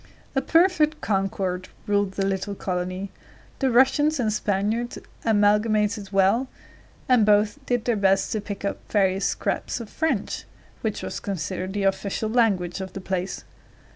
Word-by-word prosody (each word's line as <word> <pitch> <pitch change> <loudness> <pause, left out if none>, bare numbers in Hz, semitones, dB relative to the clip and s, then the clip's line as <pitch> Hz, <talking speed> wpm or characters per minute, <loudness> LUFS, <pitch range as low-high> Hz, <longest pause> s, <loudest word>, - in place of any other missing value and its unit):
A 270 - +3
perfect 325 -2 +3
concord 190 -3 -1 0.2
ruled 205 -1 +1
the 195 0 -1
little 195 +1 -2
colony. 185 +1 -3 0.5
The 270 - +2
Russians 270 +5 +4
and 220 -3 +1
Spaniards 210 +3 -1 0.3
amalgamated 210 -1 +2
well, 195 +6 +3 0.6
and 250 -4 +5
both 210 +6 +3
did 245 -2 0
their 240 - +2
best 195 -1 +2
to 215 - -1
pick 200 -1 -6
up 200 - -2
various 195 -2 +2
scraps - - -2
of 230 -3 -8
French, 275 -11 -1 0.4
which 220 -2 -2
was - - -4
considered 185 0 -4
the 205 -1 -1
official 200 +2 0
language 195 -7 +1
of 190 -1 -6
the - - -5
place. 185 0 -3
205 Hz, 145 wpm, -24 LUFS, 195-230 Hz, 0.6 s, and